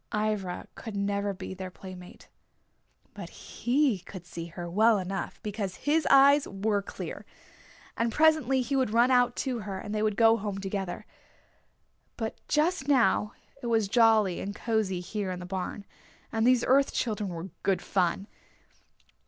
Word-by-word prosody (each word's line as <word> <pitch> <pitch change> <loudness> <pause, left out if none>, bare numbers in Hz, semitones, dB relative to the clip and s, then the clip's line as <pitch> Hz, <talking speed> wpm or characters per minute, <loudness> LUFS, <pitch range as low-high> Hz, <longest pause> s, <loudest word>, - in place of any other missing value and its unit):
Ivra 210 -4 -2
could 220 -3 -8
never 200 0 -1
be 190 0 -7
their 190 0 -6
playmate. 180 0 -12 0.9
But - - -8
he 255 -4 0
could 185 -2 -10
see 170 -1 -7
her 175 +1 -7
well 215 +5 +4
enough 195 0 -4
because 205 -3 -3
his 305 +2 +1
eyes 280 +1 +6
were 200 +1 -1
clear. 200 - -7 0.7
And 230 0 0
presently 300 -3 +3
he 275 +3 -2
would 260 -4 +2
run 235 +4 +4
out 245 -1 +3
to 255 -3 -2
her 195 -2 -5
and 205 +2 -6
they 210 - -1
would 215 -1 +1
go 225 0 +5
home 205 -2 -4
together. 195 0 -4 1.1
But 225 -1 -3
just 305 -1 +1
now 245 -6 +3 0.3
it 240 - -4
was 225 -3 +2
jolly 220 -4 +4
and 200 +1 -5
cozy 215 -6 -1
here 200 +1 -4
in 180 -1 -4
the 180 - -7
barn, 190 +2 -5 0.5
and 225 +1 +1
these 250 -1 +4
Earth 275 +2 +4
Children 210 -4 -1
were 175 +2 -6
good 195 -2 0
fun. 185 0 0
210 Hz, 160 wpm, -28 LUFS, 190-240 Hz, 1.1 s, eyes